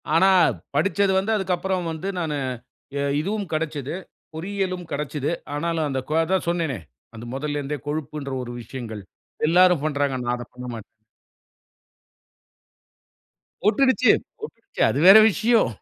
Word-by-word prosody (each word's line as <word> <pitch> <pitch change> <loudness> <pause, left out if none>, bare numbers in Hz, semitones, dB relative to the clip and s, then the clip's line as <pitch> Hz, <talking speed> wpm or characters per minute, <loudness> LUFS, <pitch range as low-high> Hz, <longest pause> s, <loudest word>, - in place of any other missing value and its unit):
ஆனா 190 +3 +6 0.5
படிச்சது 195 +5 +2
வந்து 205 +4 -1
அதுக்கு 190 -3 0
அப்புறம் 185 -2 -2
வந்து 160 +4 -5
நானு 155 -3 -2 0.6
இ - - -1 0.2
இதுவும் 200 +2 -3
கெடைச்சது. 150 -2 -2 0.4
பொறியியலும் 185 +1 -3
கெடைச்சது 145 0 -2 0.3
ஆனாலும் 165 0 -1
அந்த 135 -1 -1
கு - - -1
அதான் 185 0 0
சொன்னேனே. 165 - -1 0.4
அது 115 +2 -8
முதல்ல 145 +1 -2
இருந்தே 145 +1 -3
கொழுப்புன்ற 145 -2 -4
ஒரு 120 - -7
விஷயங்கள், 115 -3 -7 0.5
எல்லாரும் 180 -3 +5
பண்றாங்க. 140 -3 0
நான் 120 0 0
அத 120 - -7
பண்ணமாட்டேன். 125 -3 -7 2.8
போட்டுக்குச்சு, 255 +3 +4 0.3
போட்டுக்குச்சு. 420 - -6
அது 140 - -1
வேற 205 +3 +11
விஷயம். 230 - +3
160 Hz, 125 wpm, -23 LUFS, 140-190 Hz, 2.8 s, வேற